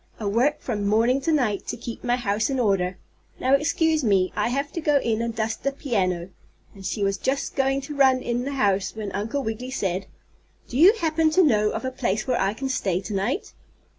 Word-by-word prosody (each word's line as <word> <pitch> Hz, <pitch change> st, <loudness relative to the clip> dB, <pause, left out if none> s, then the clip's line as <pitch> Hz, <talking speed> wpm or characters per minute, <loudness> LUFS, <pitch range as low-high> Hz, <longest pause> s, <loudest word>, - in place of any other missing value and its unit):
I 215 Hz, -, -5 dB
work 240 Hz, +9 st, +1 dB
from 205 Hz, -5 st, -2 dB
morning 230 Hz, +6 st, +3 dB
to 320 Hz, -, 0 dB
night 245 Hz, -10 st, 0 dB
to -, -, -3 dB
keep 235 Hz, 0 st, -7 dB
my 245 Hz, 0 st, +2 dB
house 220 Hz, -2 st, 0 dB
in 265 Hz, -1 st, -1 dB
order. 190 Hz, -5 st, +1 dB, 0.4 s
Now 260 Hz, +1 st, +2 dB
excuse 310 Hz, +2 st, +2 dB
me; 195 Hz, -5 st, +2 dB
I -, -, +1 dB
have 280 Hz, +3 st, -2 dB
to 335 Hz, -, -4 dB
go 295 Hz, -2 st, +3 dB
in 230 Hz, -3 st, -1 dB
and 230 Hz, -1 st, -3 dB
dust 225 Hz, 0 st, -2 dB
the 275 Hz, -, 0 dB
piano," 190 Hz, -11 st, -1 dB, 0.4 s
and 195 Hz, -, -13 dB
she 205 Hz, +2 st, -2 dB
was 195 Hz, 0 st, +1 dB
just 275 Hz, +1 st, -2 dB
going 270 Hz, 0 st, +1 dB
to 280 Hz, +2 st, -7 dB
run 260 Hz, -2 st, +4 dB
in 240 Hz, +1 st, -1 dB
the 280 Hz, +2 st, -3 dB
house, 200 Hz, -7 st, +1 dB
when 210 Hz, -2 st, -5 dB
Uncle 225 Hz, +8 st, -2 dB
Wiggily 225 Hz, +3 st, -4 dB
said: 190 Hz, -7 st, -2 dB, 0.6 s
"Do -, -, -9 dB
you 370 Hz, +6 st, +8 dB
happen 320 Hz, -5 st, +1 dB
to 365 Hz, +4 st, +4 dB
know 215 Hz, -8 st, +3 dB
of -, -, -4 dB
a 260 Hz, -, -2 dB
place 215 Hz, -3 st, -1 dB
where 255 Hz, -2 st, 0 dB
I 195 Hz, +2 st, 0 dB
can 270 Hz, +4 st, -3 dB
stay 195 Hz, -9 st, 0 dB
to 205 Hz, -, -6 dB
night?" 235 Hz, -, -2 dB
240 Hz, 225 wpm, -24 LUFS, 205-275 Hz, 0.6 s, you